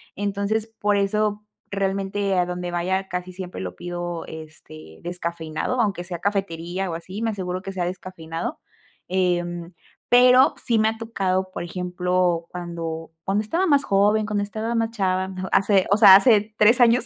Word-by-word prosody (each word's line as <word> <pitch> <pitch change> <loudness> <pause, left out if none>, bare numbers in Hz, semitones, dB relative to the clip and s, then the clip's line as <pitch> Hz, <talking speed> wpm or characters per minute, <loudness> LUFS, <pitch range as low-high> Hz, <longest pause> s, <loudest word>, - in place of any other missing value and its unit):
Entonces 205 +2 -1
por 210 -2 0
eso 210 +1 0 0.3
realmente 195 0 -1
a 180 - +3
donde 180 0 -4
vaya 190 +2 -1
casi 180 +1 -4
siempre 180 - -7
lo 90 -1 -5
pido, 175 - -5
este, 80 - -11
descafeinado. 170 +5 -3
Aunque 200 -4 -1
sea 175 -1 -6
cafetería, 190 -2 -2
o - - -4
así, 185 +5 -7
me 225 -1 0
aseguro 185 -2 -4
que 195 - -6
sea 180 -2 -2
descafeinado. 175 - -5 0.5
Em, 175 -1 -1 0.4
pero 250 +2 +6
sí 230 -3 +2
me 215 - +3
ha 220 - -5
tocado, 190 -5 -1
por - - -5
ejemplo, 180 -1 -1
cuando 165 -2 -6
cuando 200 +2 0
estaba 335 - 0
más 285 -3 +4
joven, 210 +1 +3
cuando 210 -1 -1
estaba 220 +3 -3
más 225 0 0
chava 190 -3 -1 0.2
hace, 195 -1 +3
o 200 - +5
sea, 200 -3 +10
hace 210 0 +4
3 230 +4 +5
años. 240 0 +5
190 Hz, 160 wpm, -23 LUFS, 175-210 Hz, 0.5 s, sea